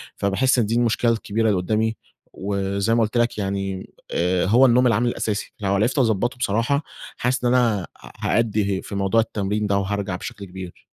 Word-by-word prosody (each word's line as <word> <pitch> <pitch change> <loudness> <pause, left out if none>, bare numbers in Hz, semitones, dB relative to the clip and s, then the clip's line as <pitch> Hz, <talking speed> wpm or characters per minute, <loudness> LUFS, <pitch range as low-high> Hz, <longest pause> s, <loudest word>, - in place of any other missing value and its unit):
فباحس 125 +7 +2
إن 115 - +2
دي 110 +3 -1
المشكلة 120 0 +2
الكبيرة 110 0 -1
اللي 100 - +2
قدّامي، 110 +4 0 0.4
وزي 100 +2 -1
ما 115 - +3
قلت 110 +2 0
لك 120 -2 +1
يعني 95 -1 -3 0.2
آآ، 90 +1 +1
هو 120 +7 +5
النوم 125 0 +5
العامل 115 +1 +2
الأساسي، 105 -3 -3
لو 100 -2 0
عرفت 115 +8 +1
اضبطه 120 0 +1
بصراحة 125 +6 0 0.3
حاسس 125 0 0
إن 120 - +3
أنا 115 -6 +3
آآ، - - -8 0.2
ه - - -11 0.3
هأدي 105 -4 0
في 100 - -7
موضوع 100 +3 +2
التمرين 105 -1 -2
ده 100 -1 +2
وهارجع 100 -1 -2
بشكل 100 +2 -7
كبير. 95 -1 -10
105 Hz, 185 wpm, -22 LUFS, 100-120 Hz, 0.4 s, هو